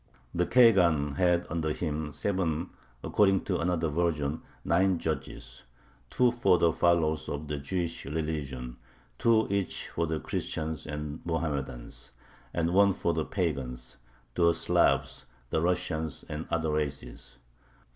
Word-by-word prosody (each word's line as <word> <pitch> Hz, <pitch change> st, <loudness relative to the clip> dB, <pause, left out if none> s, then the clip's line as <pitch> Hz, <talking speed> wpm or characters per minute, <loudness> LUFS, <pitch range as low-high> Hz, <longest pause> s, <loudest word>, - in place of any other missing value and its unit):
The 90 Hz, 0 st, +1 dB
khagan 85 Hz, -, +5 dB
had 90 Hz, -1 st, +3 dB
under 80 Hz, -1 st, -1 dB
him 75 Hz, -2 st, -3 dB
seven 90 Hz, -2 st, -1 dB, 0.3 s
(according 95 Hz, -2 st, +3 dB
to 90 Hz, -, -1 dB
another 85 Hz, -1 st, 0 dB
version, 80 Hz, -2 st, 0 dB, 0.2 s
nine) 95 Hz, +2 st, +3 dB
judges: -, -, -5 dB, 0.5 s
two 125 Hz, -1 st, +3 dB
for 100 Hz, -7 st, +3 dB
the 85 Hz, -1 st, +3 dB
followers 80 Hz, -3 st, +2 dB
of 75 Hz, +1 st, -4 dB
the 75 Hz, -1 st, -3 dB
Jewish 85 Hz, +4 st, -3 dB
religion, 70 Hz, -5 st, -4 dB, 0.4 s
two 115 Hz, -1 st, +4 dB
each 100 Hz, -2 st, -1 dB
for 85 Hz, 0 st, -1 dB
the 80 Hz, 0 st, -1 dB
Christians 80 Hz, -1 st, -3 dB
and 75 Hz, 0 st, -5 dB
Mohammedans, 75 Hz, -7 st, -3 dB, 0.4 s
and 85 Hz, 0 st, 0 dB
one 100 Hz, 0 st, +5 dB
for 85 Hz, -, 0 dB
the 80 Hz, -1 st, -1 dB
pagans 65 Hz, -8 st, -3 dB, 0.4 s
the 85 Hz, -1 st, +4 dB
Slavs, 80 Hz, -, +1 dB, 0.2 s
the 80 Hz, -, +1 dB
Russians, 85 Hz, -3 st, -1 dB
and 75 Hz, +1 st, -5 dB
other 80 Hz, -2 st, 0 dB
races. 70 Hz, -5 st, -4 dB
80 Hz, 130 wpm, -29 LUFS, 75-90 Hz, 0.5 s, khagan